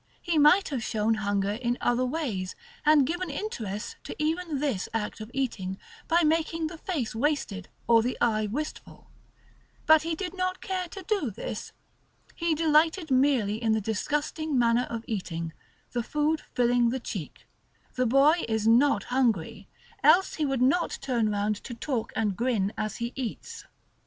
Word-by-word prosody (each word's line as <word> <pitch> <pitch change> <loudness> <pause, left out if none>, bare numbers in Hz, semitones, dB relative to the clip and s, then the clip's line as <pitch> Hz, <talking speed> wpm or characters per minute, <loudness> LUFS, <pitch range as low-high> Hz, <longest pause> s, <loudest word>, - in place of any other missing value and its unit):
He 340 -3 0
might 330 +7 +5
have 270 -5 -2
shown 220 +1 +1
hunger 200 -2 0
in 240 +3 -1
other 245 +1 +1
ways, 250 - -2 0.3
and 300 -2 +5
given 350 +4 -2
interest 230 - -4
to - - -6
even 320 0 -1
this 265 -10 -1
act 220 0 -3
of 215 - -7
eating, 205 -9 -2 0.3
by 340 +1 +3
making 325 +1 +1
the 325 +1 -5
face 305 - -3
wasted, 225 -6 -1 0.2
or 230 -1 +6
the 245 +3 -2
eye 215 -3 +2
wistful. 300 +9 -6 0.7
But 315 -1 +7
he 330 0 -2
did 360 +2 -5
not 370 0 -1
care 370 -1 -3
to 385 +3 -9
do 380 - 0
this. 215 - -6 0.6
He 335 -2 0
delighted 320 +1 +2
merely 255 -5 +2
in 225 -2 +2
the 220 - +2
disgusting 295 +7 -1
manner 240 +1 +3
of 230 -1 -5
eating, 170 -6 -4 0.4
the 240 - -1
food 300 +5 0
filling 240 -1 +3
the 260 +2 -2
cheek; 195 - -7 0.5
the 255 -1 +1
boy 285 +7 +5
is 220 -1 0
not 235 -1 +4
hungry, 235 -10 0 0.4
else 380 +2 +5
he 305 -2 -1
would 265 -2 +1
not 335 +7 +2
turn 235 -5 +1
round 205 0 0
to 240 +3 -8
talk 235 -1 -3
and 210 -3 0
grin 220 -3 0
as 215 -1 -3
he 235 +1 -4
eats. 255 -4 -6
255 Hz, 165 wpm, -27 LUFS, 220-310 Hz, 0.7 s, But